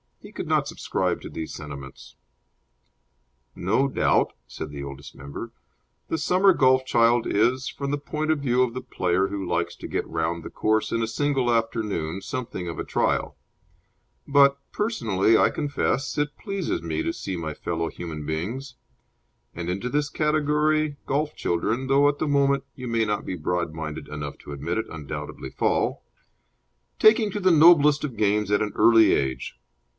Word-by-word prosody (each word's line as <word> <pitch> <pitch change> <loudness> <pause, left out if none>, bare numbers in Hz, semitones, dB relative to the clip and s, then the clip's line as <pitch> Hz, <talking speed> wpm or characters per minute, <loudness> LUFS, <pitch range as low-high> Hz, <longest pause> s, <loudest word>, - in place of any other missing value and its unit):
He - - -13
could - - -6
not - - +2
subscribe - - -2
to - - -8
these 80 - -6
sentiments. 70 -3 -9 1.4
No 110 +10 +1
doubt 135 - +2
(said 80 - -7
the 70 -1 -6
Oldest 70 0 -9
Member) 70 0 -8 0.6
the 160 - 0
summer 185 +5 +4
golf 130 -3 +4
child 115 -1 +3
is, 125 +5 +2
from 140 -1 -5
the 145 - 0
point 155 +2 -2
of 155 - +1
view 130 -2 +2
of 120 -2 -1
the 130 - -4
player 90 +2 0
who 100 -1 -4
likes 85 0 -1
to - - -8
get - - -2
round 80 +1 -2
the - - -7
course 110 0 0
in 115 - 0
a 115 - 0
single 130 +1 0
afternoon, 105 -7 -1
something 120 -9 -5
of 85 -2 -5
a - - -1
trial; - - 0 0.9
but, 140 0 +5
personally, 115 - +2
I - - +4
confess, 145 -2 -1
it 145 0 -1
pleases 195 -4 -3
me 80 -1 -2
to - - -1
see 95 - -5
my 80 -3 -4
fellow 85 -1 -2
human 80 -4 -7
beings 105 - -4 0.8
and 85 +1 -4
into 100 +7 -2
this 145 +1 0
category 150 0 +1
golf 150 +2 -1
children, 110 +9 -1
though 140 +1 +4
at 145 0 0
the - - 0
moment 140 -1 +2
you 125 -1 -7
may 115 -1 +1
not 105 -1 -2
be 95 - -3
broad 85 0 -2
minded 75 -2 -6
enough 75 -1 -6
to - - -11
admit 75 +7 -2
it, 110 - -2
undoubtedly 75 -4 -6
fall - - 0 1.0
taking 215 0 +5
to 205 - -3
the 185 -2 +4
noblest 150 -2 +6
of 130 -7 -4
games 105 0 +1
at 105 - +3
an 105 -1 -1
early 115 -1 +6
age. 65 -1 -2
115 Hz, 170 wpm, -25 LUFS, 85-145 Hz, 1.4 s, noblest